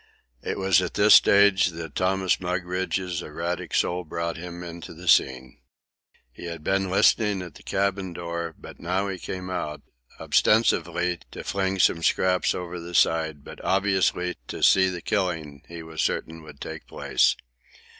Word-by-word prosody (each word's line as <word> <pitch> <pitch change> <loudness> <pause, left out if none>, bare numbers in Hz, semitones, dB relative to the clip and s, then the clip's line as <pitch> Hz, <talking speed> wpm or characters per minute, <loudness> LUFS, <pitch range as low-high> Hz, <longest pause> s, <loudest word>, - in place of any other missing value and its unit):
It - - -3
was 95 -1 +3
at 90 - -4
this 105 +1 +6
stage 100 -2 +6
that 80 -4 -7
Thomas 95 0 +1
Mugridge's 90 0 -2
erratic 85 +3 -4
soul 90 +1 +1
brought 85 +1 -4
him 85 +1 -8
into 85 -2 -9
the - - -11
scene. 65 -1 +2 0.7
He 75 - -11
had 85 -2 -7
been 95 +1 0
listening 100 0 +3
at 85 -4 -10
the - - -15
galley 100 -1 -1
door, 85 -1 -5
but - - -12
he - - -16
now 95 +3 -1
came 90 +1 -6
out, 75 -4 -4 0.4
ostensibly 90 -5 +2
to - - -8
fling 95 -1 -1
some 85 -2 +3
scraps 90 +2 +2
over 90 -1 -5
the 85 +1 -8
side, 80 -4 +2
but - - -11
obviously 95 -2 +1
to - - -6
see 95 -1 +5
the 90 -2 -6
killing 80 -8 -2
he 85 -1 -8
was 80 -1 -4
certain 80 0 -2
would 75 -3 -13
take - - -8
place. - - +1
90 Hz, 160 wpm, -25 LUFS, 85-95 Hz, 0.7 s, this